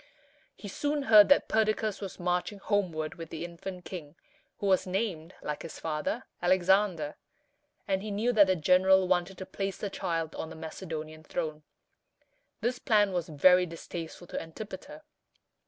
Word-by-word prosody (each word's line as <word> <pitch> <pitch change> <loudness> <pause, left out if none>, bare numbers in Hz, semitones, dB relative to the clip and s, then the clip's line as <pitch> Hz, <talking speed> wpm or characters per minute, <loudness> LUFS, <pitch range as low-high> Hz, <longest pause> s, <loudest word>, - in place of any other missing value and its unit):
He 205 - -9
soon 290 +8 -1
heard 215 -5 +8
that 285 - +5
Perdiccas 215 -1 +1
was 195 -2 -7
marching 180 +3 -1
homeward 180 -7 -1
with 165 -1 -9
the 165 +1 -5
infant 175 +1 -8
king, 165 -5 -8 0.4
who - - -4
was 190 -1 +3
named, 185 -4 -2
like 150 0 -3
his 165 - -8
father, 160 +10 -2 0.2
Alexander; 185 -3 +2 0.7
and 190 -1 +1
he 215 - -5
knew 220 +4 0
that 205 -3 +7
the 185 - +3
general 185 +3 +4
wanted 180 +1 0
to 190 - -6
place 195 0 -4
the 205 - -4
child 165 -3 -2
on 160 - -5
the - - -9
Macedonian 155 -1 -7
throne. 155 -2 -4 1.0
This 245 +1 -1
plan 205 -3 +3
was 175 -2 -2
very 180 +4 +5
distasteful 165 +1 -7
to - - -5
Antipater. 215 - -9
185 Hz, 155 wpm, -29 LUFS, 165-205 Hz, 1.0 s, heard